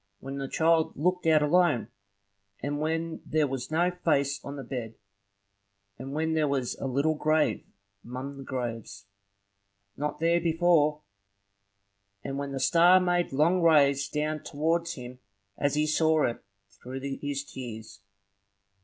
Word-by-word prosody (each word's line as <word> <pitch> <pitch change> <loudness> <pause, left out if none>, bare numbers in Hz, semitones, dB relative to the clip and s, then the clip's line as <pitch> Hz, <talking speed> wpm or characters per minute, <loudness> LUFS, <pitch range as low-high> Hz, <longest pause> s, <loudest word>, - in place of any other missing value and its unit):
when 135 +1 -6
the 135 - -3
child 160 +2 +2
looked 180 +3 0
out 155 -2 +5
alone, 150 -7 +3 0.7
and 145 +1 -3
when 160 +1 -2
there 155 -1 +1
was 130 -2 -4
no 170 +3 +2
face 145 -6 0
on 140 - -6
the 140 - -6
bed; 120 -3 -6 1.0
and 135 +2 -7
when 160 +1 0
there 155 -1 +2
was 135 -3 -1
a - - -3
little 140 +5 +1
grave 155 0 +1 0.4
among 130 +3 -6
the 135 - -9
graves, 115 -6 -5 0.9
not 150 +1 -3
there 170 +1 +2
before; 160 -3 +2 1.2
and 135 +1 -4
when 140 0 -4
the 135 - -3
star 175 +6 +6
made 175 -1 0
long 165 +7 +2
rays 140 -4 +4
down 155 +1 -2
towards 165 +3 -1
him, 125 -1 -9 0.4
as 145 +4 0
he 150 +1 +2
saw 155 0 +2
it 120 - -2 0.2
through 125 +7 -9 0.2
his 145 -1 -3
tears. 110 -7 -9
150 Hz, 145 wpm, -28 LUFS, 135-160 Hz, 1.2 s, star